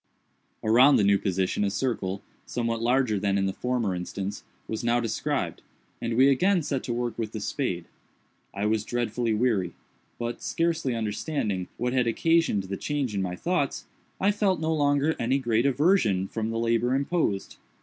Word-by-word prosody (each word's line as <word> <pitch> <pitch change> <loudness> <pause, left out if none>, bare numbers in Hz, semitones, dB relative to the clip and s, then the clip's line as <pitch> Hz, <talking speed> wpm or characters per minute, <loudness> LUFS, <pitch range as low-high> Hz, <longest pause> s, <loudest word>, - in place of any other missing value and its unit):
Around 125 +6 +6
the - - +4
new 100 0 +4
position 95 +1 0
a 100 - +2
circle, 100 -4 -2 0.2
somewhat 115 -1 -2
larger 120 -3 +2
than 100 0 +1
in 95 - +1
the 95 - -1
former 125 -5 -1
instance, 95 +2 -5 0.2
was 110 - -4
now 120 +1 +2
described, 115 -2 -2 0.4
and 115 0 -1
we 130 +3 +6
again 175 +6 +3
set 140 -3 -1
to - - -3
work 120 -1 -3
with 110 -1 -3
the 110 - -3
spades. 100 - -2 0.7
I 100 +1 -3
was 110 0 +1
dreadfully 120 -1 -1
weary, 105 -6 +1 0.4
but, 120 0 -4
scarcely 165 -6 0
understanding 105 - -2
what 125 +1 -1
had 125 -2 +2
occasioned 165 -4 +2
the 95 +1 -5
change 145 -6 -2
in 100 - -1
my 90 -1 -2
thoughts, 170 - -1 0.3
I 200 +2 +3
felt 200 -3 +1
no 160 0 0
longer 145 +1 +2
any 125 +4 +2
great 120 -1 +1
aversion 135 - +2
from 110 +1 -3
the 115 - -2
labor 115 +2 +1
imposed. 140 - -1
120 Hz, 170 wpm, -27 LUFS, 105-140 Hz, 0.7 s, Around